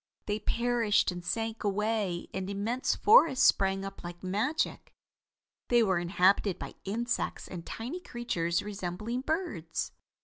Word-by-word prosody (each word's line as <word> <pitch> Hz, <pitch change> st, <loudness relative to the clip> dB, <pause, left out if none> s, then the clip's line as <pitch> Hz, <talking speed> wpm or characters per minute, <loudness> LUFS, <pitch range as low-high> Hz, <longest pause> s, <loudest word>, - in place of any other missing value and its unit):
They 210 Hz, 0 st, -1 dB
perished 235 Hz, -3 st, +2 dB
and 175 Hz, -1 st, -7 dB
sank 225 Hz, +4 st, -2 dB
away 205 Hz, -3 st, 0 dB
and 190 Hz, 0 st, -3 dB
immense 215 Hz, +6 st, -1 dB
forests 330 Hz, -, +6 dB
sprang 195 Hz, 0 st, +3 dB
up 195 Hz, 0 st, -8 dB
like 175 Hz, +1 st, -8 dB
magic. 215 Hz, -, -1 dB, 0.7 s
They 240 Hz, -1 st, +5 dB
were 190 Hz, -4 st, +2 dB
inhabited 185 Hz, +2 st, +3 dB
by -, -, -7 dB
insects 235 Hz, +5 st, -2 dB
and 175 Hz, -3 st, -7 dB
tiny 250 Hz, +11 st, -5 dB
creatures 175 Hz, -, -2 dB
resembling 210 Hz, +4 st, -4 dB
birds. 270 Hz, -, -2 dB
205 Hz, 130 wpm, -30 LUFS, 185-240 Hz, 0.7 s, forests